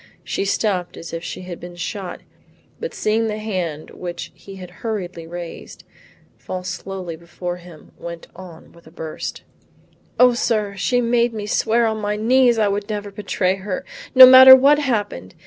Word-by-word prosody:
She 195 - -3
stopped 195 -3 -1
as 165 - -9
if 165 0 -5
she - - -6
had 180 -2 -8
been 175 0 -10
shot, 180 +1 -6 0.6
but 480 +1 -6
seeing 220 +1 0
the 215 -1 -3
hand 180 -8 -4
which 175 -1 -7
he 195 - -13
had 180 -2 -10
hurriedly 180 -7 -5
raised, 175 0 -9 0.6
fall 185 -1 -6
slowly 185 -2 -6
before 175 +2 -6
him, 175 -3 -15
went 170 -1 -8
on 175 -3 -13
with 170 -1 -19
a - - -12
burst, 160 -2 -7 0.8
"O 250 0 +6
sir, 215 -4 -1
she 245 +6 0
made 235 0 +1
me 210 -1 -4
swear 230 +2 +1
on 220 -1 -1
my 210 0 -2
knees 240 +2 +3
I 215 -2 +2
would 200 +1 -2
never 205 -1 -4
betray 195 -2 -1
her, 195 +6 -5 0.3
no 260 0 +12
matter 260 +1 +11
what 280 +3 +4
happened. 205 - -3
200 Hz, 170 wpm, -20 LUFS, 175-225 Hz, 0.8 s, no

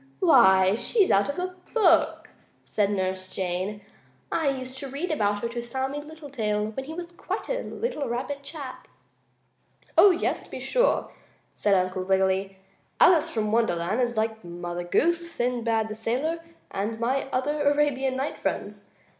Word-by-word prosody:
"Why, 190 0 +6
she's 390 - +2
out 200 +6 +3
of 285 - -3
a 365 0 -3 0.2
book," 345 -7 +3 0.3
said 205 -2 0
Nurse 185 -2 -2
Jane. 190 +3 -3 0.5
"I 320 - +1
used 260 -1 -5
to 275 - -5
read 285 +6 -3
about 205 -7 +1
her 235 - -1
to 240 0 -4
Sammie 265 +4 -3
Littletail, 265 -9 -3
when 265 +4 -5
he 310 - -7
was 345 0 -6
quite 375 +3 -5
a - - -1
little 300 - -3
rabbit 270 +4 -3
chap." 280 -2 -8 1.1
"Oh, 405 - +8
yes, 360 -2 0
to - - -16
be - - -6
sure," - - +1 0.4
said 205 -1 +2
Uncle 185 0 0
Wiggily. 190 0 +1 0.4
"Alice 340 -4 +6
from 215 -2 -1
Wonderland 215 -1 +1
is 240 -2 0
like 220 0 -1
Mother 175 0 -5
Goose, 340 - +1
Sinbad 235 -4 0
the 215 - -5
Sailor 255 +10 -1 0.3
and 215 +3 -3
my 255 +4 0
other 290 +4 0
Arabian 285 -2 +2
Night 270 +3 -3
friends. - - -4
240 Hz, 155 wpm, -26 LUFS, 205-295 Hz, 1.1 s, Oh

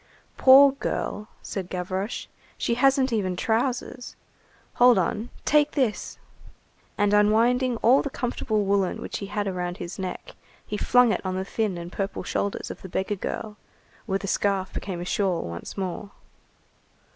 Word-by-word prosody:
"Poor 270 +1 +8
girl!" 215 -5 -3 0.2
said 190 -3 -5
Gavroche. 185 +4 -3 0.3
"She - - 0
hasn't 265 +1 +3
even 190 -5 0
trousers. 245 +3 -2 0.7
Hold 245 -3 +7
on, 210 +6 -1 0.2
take 300 0 +3
this." 255 -7 -1 0.8
And 205 0 +2
unwinding 230 +4 +3
all 255 +4 +6
the 280 - -3
comfortable 220 -5 -1
woollen 195 -2 +1
which - - -5
he 200 - -5
had 205 0 -2
around 180 -2 -3
his 175 +3 -7
neck, 185 -1 -5 0.3
he 210 - -4
flung 245 +2 +4
it - - -2
on 185 -1 -2
the 190 0 -2
thin 210 -3 -1
and 170 +1 -7
purple 195 0 -3
shoulders 200 +2 -2
of - - -10
the 190 - -9
beggar 190 +4 -1
girl, 210 +2 -5 0.5
where 195 -2 +1
the 195 - -7
scarf 195 -1 0
became 185 -3 -4
a - - -5
shawl 185 -2 0
once 85 - -7
more. 190 +1 -4
205 Hz, 155 wpm, -25 LUFS, 190-240 Hz, 0.8 s, Poor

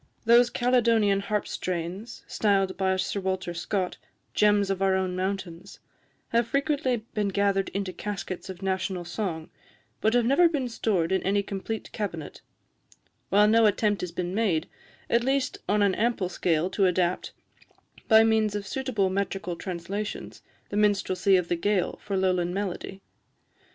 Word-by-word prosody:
Those 240 +1 +6
Caledonian 230 -5 +3
harp 205 +1 -2
strains, 185 +6 -4
styled 195 -3 +1
by 190 0 +1
Sir 185 +2 -2
Walter 185 -2 -2
Scott 180 +2 -2 0.4
"gems 205 -1 +3
of 195 -1 -2
our 190 -1 +3
own 185 -1 -1
mountains," 190 -1 -4 0.5
have 235 0 +2
frequently 275 -4 0
been 210 -1 0
gathered 200 0 +1
into 195 -1 -3
caskets 190 -1 -5
of 190 0 -8
national 190 -1 -2
song, 170 -3 -4 0.5
but 220 +2 +2
have 240 -1 +3
never 335 +8 +5
been 285 -6 -1
stored 195 -7 0
in 190 - +2
any 200 +1 +1
complete 200 +3 -5
cabinet; 170 -8 -5 0.9
while 205 +2 +5
no 225 +1 +5
attempt 210 0 +1
has 180 - -4
been 175 +1 -3
made, 190 -7 +1 0.4
at 235 0 +2
least 270 +1 0
on 210 0 +3
an 200 -2 +3
ample 220 -5 0
scale, 170 -2 +1
to 195 0 +3
adapt, 180 0 0 0.8
by 220 -1 +7
means 220 -2 +2
of 205 -1 -3
suitable 220 -5 -1
metrical 190 -2 -2
translations, 185 +4 -5 0.3
the 205 - -3
minstrelsy 200 -2 +3
of 180 -2 -1
the 175 - 0
Gaël 195 +2 0
for 200 -2 -3
Lowland 180 -1 +1
melody. 195 -1 -4
195 Hz, 150 wpm, -27 LUFS, 185-215 Hz, 0.9 s, by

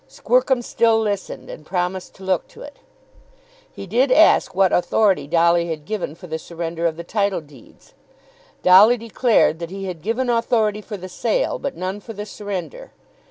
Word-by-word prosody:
Squercum 270 - +1
still 230 -1 +2
listened, 205 -3 -3
and - - -10
promised 180 +2 -3
to 190 - -14
look 190 -2 -1
to - - -13
it. 290 - -12 0.9
He - - -9
did 245 +8 +1
ask 320 - +4
what 190 -1 +3
authority 180 -5 +2
Dolly 170 +1 +3
had 155 -2 -5
given 205 -7 -4
for 180 - -13
the 160 -2 -5
surrender 170 0 -3
of 160 -1 -4
the 170 - -6
title 200 +1 -1
deeds. 150 - -19 0.7
Dolly 205 +7 +7
declared 230 -6 +1
that 170 -1 -6
he 195 +1 -6
had 180 -4 -6
given 230 +7 -1
authority 230 -3 +1
for 210 0 -7
the 185 0 -8
sale, - - -1
but 280 - -5
none 185 +3 -4
for 225 +2 -10
the 205 0 -6
surrender. 210 - -7
195 Hz, 175 wpm, -21 LUFS, 175-230 Hz, 0.9 s, Dolly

